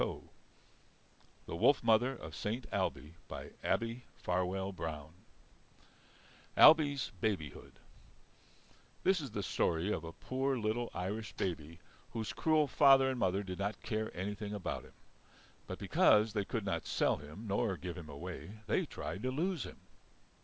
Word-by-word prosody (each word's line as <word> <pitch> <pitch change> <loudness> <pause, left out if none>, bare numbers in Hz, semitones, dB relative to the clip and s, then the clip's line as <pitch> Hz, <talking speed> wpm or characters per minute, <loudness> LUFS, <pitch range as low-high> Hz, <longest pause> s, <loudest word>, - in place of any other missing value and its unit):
The - - -5
Wolf - - +4
Mother 120 +4 +4
of 80 -9 -9
Saint 105 +10 -3
Ailbe 75 +2 -1 0.5
ABBIE 115 +2 0 0.2
FARWELL 95 +2 -1
BROWN 80 -4 -5 1.4
Ailbe's 145 -5 +7
Babyhood 90 -10 -2 1.3
This 190 -3 +3
is 140 - -5
the 105 -2 -3
story 85 +2 +1
of 80 - -1
a 80 - -6
poor 130 +7 -1
little 115 +1 -1
Irish 105 +4 -3
baby 85 -3 -3 0.4
whose 110 -4 -3
cruel 155 +6 +3
father 135 -2 +6
and 130 - -3
mother 95 0 +1
did 95 -1 -6
not 100 +2 -2
care 110 0 -1
anything 105 +2 -3
about 100 - -4
him. - - -17 0.7
But - - -5
because 105 0 +4
they 105 -3 0
could 110 -1 -3
not 85 -4 -2
sell - - +2
him 75 +10 -10
nor 100 -1 0
give 90 +1 -5
him 85 -4 -9
away 90 +7 -7
they - - +1
tried 95 - -5
to 130 - -1
lose 165 +5 -1
him. - - -11
105 Hz, 140 wpm, -34 LUFS, 90-120 Hz, 1.4 s, Ailbe's